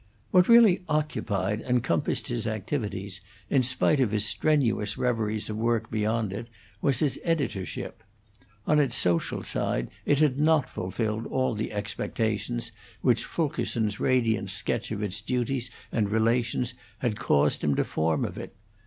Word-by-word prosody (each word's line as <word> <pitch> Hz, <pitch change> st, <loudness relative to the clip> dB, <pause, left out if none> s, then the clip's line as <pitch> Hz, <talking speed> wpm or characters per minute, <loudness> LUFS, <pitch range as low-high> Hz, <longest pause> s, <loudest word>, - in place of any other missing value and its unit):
What 180 Hz, -1 st, +5 dB
really 225 Hz, -6 st, +7 dB
occupied 105 Hz, -9 st, -1 dB
and 125 Hz, -1 st, +1 dB
compassed 85 Hz, -, 0 dB
his -, -, -1 dB
activities, 105 Hz, -4 st, -3 dB, 0.3 s
in 135 Hz, -, +4 dB
spite 130 Hz, +3 st, +2 dB
of 130 Hz, -5 st, +3 dB
his 105 Hz, 0 st, 0 dB
strenuous 115 Hz, -4 st, +1 dB
reveries 110 Hz, -3 st, -1 dB
of 110 Hz, -, -4 dB
work 115 Hz, 0 st, 0 dB
beyond 110 Hz, -1 st, 0 dB
it, 110 Hz, +4 st, -5 dB, 0.3 s
was 140 Hz, -3 st, +2 dB
his 145 Hz, 0 st, 0 dB
editorship. 140 Hz, -, -2 dB, 0.6 s
On 150 Hz, 0 st, +4 dB
its 135 Hz, -4 st, +2 dB
social 85 Hz, -8 st, 0 dB
side -, -, -2 dB, 0.2 s
it 145 Hz, -, +4 dB
had 145 Hz, -2 st, +2 dB
not 155 Hz, -2 st, +4 dB
fulfilled 110 Hz, +4 st, -3 dB
all 130 Hz, -2 st, 0 dB
the 110 Hz, 0 st, -3 dB
expectations 110 Hz, +2 st, -2 dB, 0.3 s
which 120 Hz, -3 st, +3 dB
Fulkerson's 115 Hz, -9 st, -1 dB
radiant 115 Hz, -6 st, +1 dB
sketch 105 Hz, +4 st, -2 dB
of 105 Hz, -1 st, -2 dB
its 105 Hz, +1 st, -2 dB
duties 125 Hz, +2 st, -1 dB, 0.2 s
and 105 Hz, -3 st, +1 dB
relations 115 Hz, +2 st, +1 dB, 0.2 s
had 110 Hz, -4 st, -2 dB
caused 70 Hz, 0 st, +2 dB
him 75 Hz, -2 st, +2 dB
to -, -, +2 dB
form 80 Hz, 0 st, 0 dB
of -, -, -6 dB
it. -, -, -8 dB
115 Hz, 150 wpm, -27 LUFS, 105-130 Hz, 0.6 s, really